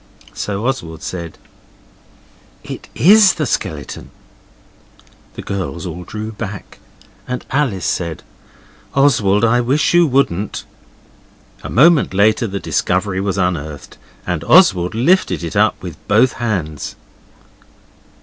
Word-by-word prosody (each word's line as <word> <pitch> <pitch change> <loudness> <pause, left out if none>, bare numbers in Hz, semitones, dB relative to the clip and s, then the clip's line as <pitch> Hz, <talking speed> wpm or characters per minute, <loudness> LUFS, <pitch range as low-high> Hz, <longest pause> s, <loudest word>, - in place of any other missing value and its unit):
So 105 +2 -4
Oswald 85 -11 -3
said 85 -3 -6 1.3
'It - - -8
IS 195 - +6
the 155 -3 -1
skeleton.' 120 - -4 1.3
The - - -7
girls 95 -4 -4
all 90 0 -7
drew 110 +3 -6
back, 105 -2 -8 0.5
and 125 0 -4
Alice 125 - 0
said, 85 -2 -2 0.7
'Oswald, 115 -7 +3
I 120 +2 +3
wish 135 +8 +1
you 175 -1 +5
wouldn't.' 110 - 0 1.0
A - - -7
moment 150 - +4
later 110 +4 +3
the 100 -1 -4
discovery 95 +1 -1
was 100 -1 -2
unearthed, 80 -6 -3 0.3
and 85 -3 -2
Oswald 105 - +4
lifted 140 - +2
it 85 - -5
up, - - +2
with - - -7
both 115 +5 +3
hands. 90 - -3
105 Hz, 115 wpm, -17 LUFS, 90-130 Hz, 1.3 s, IS